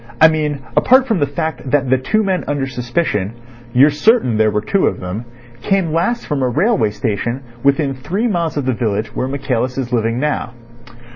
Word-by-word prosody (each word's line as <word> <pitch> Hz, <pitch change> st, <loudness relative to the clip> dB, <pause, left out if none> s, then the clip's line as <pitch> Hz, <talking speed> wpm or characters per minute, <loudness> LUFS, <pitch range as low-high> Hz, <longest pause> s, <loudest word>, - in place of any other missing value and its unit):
I 160 Hz, -, +8 dB
mean 150 Hz, -3 st, -2 dB
apart 260 Hz, +1 st, +5 dB
from 220 Hz, -7 st, +1 dB
the 145 Hz, -, +1 dB
fact 155 Hz, -1 st, -4 dB
that 135 Hz, -1 st, +1 dB
the 130 Hz, -, +4 dB
two 215 Hz, +12 st, +1 dB
men 190 Hz, -2 st, 0 dB
under 145 Hz, -2 st, -1 dB
suspicion—you're 120 Hz, -, 0 dB
certain 150 Hz, -, +3 dB
there 110 Hz, 0 st, +3 dB
were 105 Hz, 0 st, 0 dB
two 195 Hz, -, +1 dB
of -, -, -2 dB
them—came 120 Hz, -, -3 dB
last 235 Hz, +9 st, 0 dB
from 145 Hz, -2 st, -2 dB
a 130 Hz, -, +1 dB
railway 170 Hz, -, +2 dB
station 115 Hz, +4 st, -3 dB, 0.2 s
within 140 Hz, +1 st, +2 dB
three 160 Hz, -, -3 dB
miles 170 Hz, -7 st, -1 dB
of 145 Hz, -, -1 dB
the 130 Hz, -, +1 dB
village 110 Hz, -2 st, -2 dB
where 130 Hz, -, -1 dB
Michaelis 130 Hz, -2 st, -2 dB
is 125 Hz, -2 st, -3 dB
living 115 Hz, 0 st, 0 dB
now." 145 Hz, -3 st, -2 dB
135 Hz, 185 wpm, -17 LUFS, 120-160 Hz, 0.2 s, I